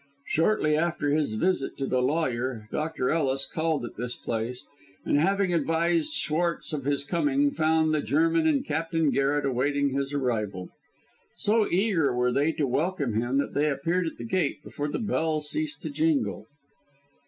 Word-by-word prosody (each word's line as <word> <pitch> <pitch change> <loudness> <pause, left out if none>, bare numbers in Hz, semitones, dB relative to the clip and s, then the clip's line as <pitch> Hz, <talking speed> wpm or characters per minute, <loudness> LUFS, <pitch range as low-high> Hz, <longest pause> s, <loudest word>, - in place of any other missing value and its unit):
Shortly 160 -2 +2
after 155 -2 0
his 145 -7 0
visit 175 +2 0
to 135 - -2
the 130 -1 +1
lawyer, 125 -6 -1
Dr. 155 -4 -1
Ellis 135 -4 +1
called 160 -5 -1
at 120 - -10
this 120 0 -4
place, 115 +2 -4 0.4
and 145 - +2
having 195 +2 +2
advised 165 +1 +1
Schwartz 170 +1 0
of 140 -3 -3
his 140 0 +1
coming, 280 - +1
found 160 - +2
the 155 - +1
German 160 +6 +2
and 150 -3 +2
Captain 160 0 0
Garret 140 +1 +1
awaiting 140 +2 +1
his 135 +1 -2
arrival. 110 -9 -2 0.7
So 215 0 +2
eager 175 - +1
were 125 0 +2
they 145 +5 +2
to 150 - 0
welcome 140 - -1
him 120 +5 0
that 140 - -1
they 150 +1 +2
appeared 165 +6 0
at - - -6
the - - -7
gate 150 +1 -1
before 145 0 -4
the 145 - -2
bell 160 -8 0
ceased 310 - -2
to - - -4
jingle. 305 -2 0
150 Hz, 165 wpm, -27 LUFS, 135-165 Hz, 0.7 s, Shortly